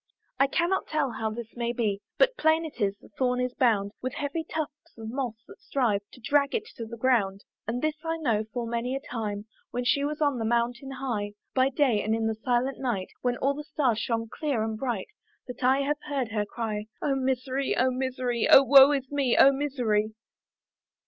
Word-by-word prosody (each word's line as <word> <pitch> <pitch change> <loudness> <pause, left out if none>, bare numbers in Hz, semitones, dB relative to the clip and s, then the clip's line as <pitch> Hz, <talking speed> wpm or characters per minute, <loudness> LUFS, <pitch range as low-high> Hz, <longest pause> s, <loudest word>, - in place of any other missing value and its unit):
I 275 - +5
cannot 345 +6 0
tell 300 -4 0
how 220 -1 -2
this 230 +1 -7
may 235 0 -1
be, 210 -4 -1 0.2
But - - +4
plain 320 -3 +2
it 295 -6 -8
is, 200 -1 +1
the - - -18
thorn 250 -1 +2
is 250 0 -1
bound 220 -7 +2
With 255 0 -3
heavy 290 +3 -2
tufts 305 -4 -6
of 225 0 -6
moss, 250 -3 -2
that - - -14
strive 230 -7 0
To - - -13
drag 280 +3 +2
it 435 -2 -1
to 230 - -5
the 235 +1 -8
ground. 215 -6 +1 0.2
And 240 +4 -2
this 310 0 -1
I 325 0 -1
know, 225 -9 0
full 235 +1 -3
many 235 +3 -2
a - - -1
time, 215 -6 -4 0.2
When 245 0 -3
she 280 +3 +2
was 300 +1 -2
on 285 -5 +1
the - - -1
mountain 240 +3 0
high, 240 -7 -3 0.2
By 260 0 +3
day, 255 -6 +2
and 215 +2 0
in 225 0 -1
the 220 - +1
silent 245 +4 -1
night, 230 -8 -2
When 245 -1 0
all 275 +1 +1
the 300 +1 -6
stars 280 -7 0
shone 230 -1 -1
clear 265 -1 -2
and 220 0 -2
bright, 225 -4 -3 0.4
That 250 0 -8
I 265 +2 +4
have 295 +1 0
heard 270 -5 -1
her 210 -2 -1
cry, 215 -2 -3
"Oh 280 - 0
misery! 265 0 -1
oh 255 +1 +3
misery! 255 -2 -1
"O 275 - +9
woe 270 +1 +8
is 270 -2 -2
me! 275 -4 +1
oh 275 - +8
misery!" 240 -7 0
250 Hz, 210 wpm, -27 LUFS, 225-275 Hz, 0.4 s, O